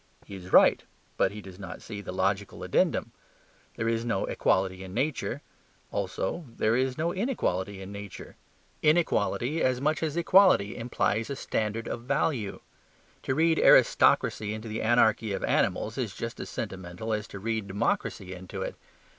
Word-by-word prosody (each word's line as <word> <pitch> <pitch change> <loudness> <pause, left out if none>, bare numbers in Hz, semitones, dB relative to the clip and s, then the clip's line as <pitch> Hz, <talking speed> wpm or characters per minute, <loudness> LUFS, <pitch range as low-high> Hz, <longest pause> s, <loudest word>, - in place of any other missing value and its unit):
He - - -11
is 90 -1 -9
right, - - +6 0.3
but - - +2
he 105 +1 -8
does 95 0 -11
not 90 -2 -7
see 105 -2 -7
the 95 - -6
logical 95 +2 -1
addendum. - - +1 0.6
There 115 - -2
is 115 0 0
no 115 -5 0
equality 95 0 0
in 95 0 -9
nature; 145 -1 -1 0.5
also 165 - -3
there 110 +1 +2
is 130 0 0
no 170 +2 0
inequality 100 - -2
in 95 - -9
nature. 100 -1 -9 0.5
Inequality, 155 -2 +2
as 130 -1 +2
much 150 +3 0
as 160 0 -2
equality, 170 - +5
implies 115 -2 -1
a 140 - -3
standard 110 -2 -2
of 120 - -4
value. 125 -4 -1 0.6
To 130 - -1
read 160 +1 +3
aristocracy 105 0 +4
into 110 +1 -7
the 110 0 -3
anarchy 110 -2 +3
of - - -3
animals - - 0
is - - -3
just - - -5
as - - -6
sentimental 95 +4 -5
as 105 +1 -2
to - - -9
read 110 0 -2
democracy 95 -1 -2
into 90 0 -6
it. - - -4
110 Hz, 165 wpm, -28 LUFS, 100-130 Hz, 0.6 s, right